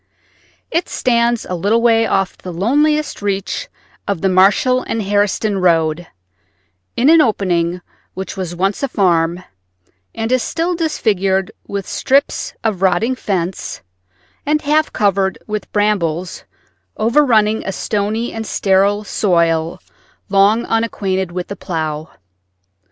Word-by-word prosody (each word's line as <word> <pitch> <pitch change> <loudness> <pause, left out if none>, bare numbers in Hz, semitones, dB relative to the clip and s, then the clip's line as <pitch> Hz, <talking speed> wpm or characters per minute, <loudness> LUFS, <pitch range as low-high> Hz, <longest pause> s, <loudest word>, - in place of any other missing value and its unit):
It 335 +2 0
stands 235 -1 +1
a - - -5
little 205 +6 +1
way 225 -1 +3
off 195 -1 0
the 185 - -8
loneliest 295 - +1
reach 200 - -2 0.4
of 200 -5 -2
the 195 - +2
Marshall 200 +7 +4
and 225 - -3
Harriston 205 0 0
road, 165 -1 +2 0.9
in 255 - +3
an 325 +1 +7
opening 180 - 0 0.3
which 190 +1 -5
was 180 -3 -4
once 195 +7 -1
a 275 - 0
farm 175 -5 +1 0.7
and 225 +1 -2
is 255 -1 +3
still 335 +7 -1
disfigured 200 - 0 0.2
with 200 -2 -4
strips 275 +2 0
of 215 -5 -1
rotting 195 +6 +2
fence 190 -7 -3 0.6
and 300 +1 0
half 310 +1 +2
covered 195 -2 +1
with 210 -1 -5
brambles 185 -5 -1 0.5
overrunning 225 -3 +3
a 195 - -3
stony 210 +4 -2
and 225 -1 -5
sterile 200 +2 +2
soil 170 -4 +1 0.5
long 200 +4 +3
unacquainted 190 -5 -1
with 180 0 -4
the 200 - -6
plow. 155 -4 -4
200 Hz, 125 wpm, -17 LUFS, 185-230 Hz, 0.9 s, an